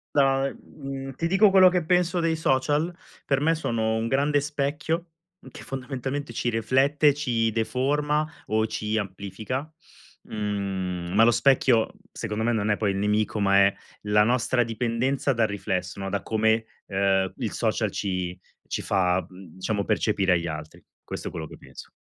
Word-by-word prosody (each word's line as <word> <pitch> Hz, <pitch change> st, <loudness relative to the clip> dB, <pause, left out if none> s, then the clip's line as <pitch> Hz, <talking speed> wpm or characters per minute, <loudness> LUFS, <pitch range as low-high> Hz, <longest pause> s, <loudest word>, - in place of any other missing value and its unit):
Da, 135 Hz, -1 st, +3 dB
mhmm, 135 Hz, -2 st, -8 dB
ti 165 Hz, -, -1 dB
dico 195 Hz, +3 st, +5 dB
quello 190 Hz, -1 st, +7 dB
che 180 Hz, -1 st, 0 dB
penso 180 Hz, 0 st, +2 dB
dei 165 Hz, -1 st, +1 dB
social? 150 Hz, +3 st, +1 dB, 0.3 s
Per 140 Hz, -1 st, +1 dB
me 165 Hz, +2 st, +3 dB
sono 115 Hz, -7 st, -1 dB
un 110 Hz, +1 st, -1 dB
grande 145 Hz, +3 st, +2 dB
specchio 150 Hz, +4 st, -2 dB, 0.4 s
che -, -, -11 dB
fondamentalmente 135 Hz, 0 st, -4 dB
ci 120 Hz, -, -1 dB
riflette 135 Hz, +6 st, +2 dB
e -, -, +3 dB
ci 115 Hz, -6 st, 0 dB
deforma 145 Hz, +6 st, 0 dB, 0.2 s
o 110 Hz, 0 st, +1 dB
ci 110 Hz, 0 st, -2 dB
amplifica, 105 Hz, -, -4 dB, 0.5 s
mhmm, 95 Hz, -4 st, -3 dB
ma 110 Hz, +2 st, +5 dB
lo 120 Hz, -, +6 dB
specchio 125 Hz, -3 st, +3 dB, 0.2 s
secondo 110 Hz, -1 st, -3 dB
me 120 Hz, -, +2 dB
non 110 Hz, -1 st, 0 dB
è 105 Hz, -, +1 dB
poi 105 Hz, -2 st, +1 dB
il 95 Hz, -, -3 dB
nemico, 105 Hz, +1 st, 0 dB
ma 100 Hz, -1 st, +4 dB
è 100 Hz, -, +2 dB, 0.3 s
la 105 Hz, 0 st, +4 dB
nostra 120 Hz, +1 st, +2 dB
dipendenza 120 Hz, +4 st, 0 dB
dal 115 Hz, -2 st, +2 dB
riflesso, 95 Hz, -2 st, -3 dB
no, 95 Hz, 0 st, -3 dB
da 100 Hz, 0 st, -2 dB
come, 110 Hz, 0 st, +1 dB, 0.2 s
ehm, 95 Hz, -1 st, +1 dB
il -, -, -3 dB
social -, -, 0 dB
ci 90 Hz, -2 st, -3 dB, 0.3 s
ci -, -, -2 dB
fa, 95 Hz, -1 st, +1 dB
mhmm, 90 Hz, -3 st, -14 dB
diciamo, 100 Hz, +2 st, -1 dB
percepire 105 Hz, -3 st, +2 dB
agli 85 Hz, -1 st, 0 dB
altri. 80 Hz, 0 st, -7 dB, 0.2 s
Questo -, -, -6 dB
è -, -, -13 dB
quello 80 Hz, -2 st, -5 dB
che -, -, -12 dB
penso. -, -, -12 dB
115 Hz, 170 wpm, -25 LUFS, 100-140 Hz, 0.5 s, quello